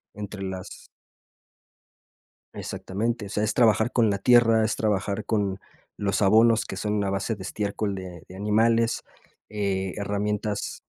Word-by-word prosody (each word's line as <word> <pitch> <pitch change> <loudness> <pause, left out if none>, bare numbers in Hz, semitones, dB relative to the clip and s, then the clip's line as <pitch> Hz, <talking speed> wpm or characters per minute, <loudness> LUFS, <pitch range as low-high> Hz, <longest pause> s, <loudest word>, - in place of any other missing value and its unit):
entre 105 -1 -7
las 95 -1 -7 1.7
Exactamente. 110 +3 -3
O - - -8
sea, 105 +1 -1
es 110 - 0
trabajar 110 0 +3
con 115 -3 +3
la 100 - 0
tierra, 115 0 +5
es 110 - 0
trabajar 105 0 -1
con 100 -3 -1 0.4
los 100 0 0
abonos 110 +3 +5
que - - -6
son 105 -1 -1
a 100 - -1
base 100 +3 -1
de 100 - -12
estiércol 100 +1 -2
de 90 -3 -8
de 90 - -11
animales, 115 +3 +2 0.5
eh, 95 -3 -2
herramientas 105 +1 -2
105 Hz, 140 wpm, -25 LUFS, 100-110 Hz, 1.7 s, tierra